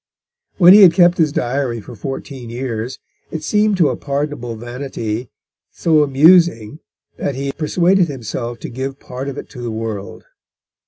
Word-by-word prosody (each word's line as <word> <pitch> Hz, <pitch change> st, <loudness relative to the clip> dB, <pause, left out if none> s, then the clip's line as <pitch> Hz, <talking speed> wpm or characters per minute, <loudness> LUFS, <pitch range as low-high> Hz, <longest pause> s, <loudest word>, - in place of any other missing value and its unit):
When 180 Hz, -1 st, +8 dB
he 210 Hz, -, +8 dB
had 180 Hz, -4 st, +8 dB
kept 175 Hz, -1 st, +4 dB
his 155 Hz, -3 st, +3 dB
diary 125 Hz, -2 st, -2 dB
for 110 Hz, -, -11 dB
fourteen 135 Hz, +1 st, -7 dB
years, 120 Hz, 0 st, -4 dB, 0.3 s
it 160 Hz, -1 st, -6 dB
seemed 210 Hz, +3 st, +1 dB
to 165 Hz, -5 st, +4 dB
a -, -, -2 dB
pardonable 140 Hz, -4 st, -4 dB
vanity 120 Hz, -1 st, -5 dB, 0.4 s
so 160 Hz, -2 st, +2 dB
amusing, 150 Hz, -3 st, +4 dB, 0.4 s
that 140 Hz, -, -3 dB
he 135 Hz, +1 st, -3 dB
persuaded 175 Hz, +5 st, +2 dB
himself 120 Hz, -3 st, -5 dB
to -, -, -6 dB
give 135 Hz, +3 st, -5 dB
part 130 Hz, +2 st, -6 dB
of 140 Hz, -, -7 dB
it -, -, -7 dB
to 125 Hz, -, -10 dB
the 120 Hz, -, -4 dB
world. 110 Hz, -3 st, -6 dB
135 Hz, 160 wpm, -18 LUFS, 120-160 Hz, 0.4 s, When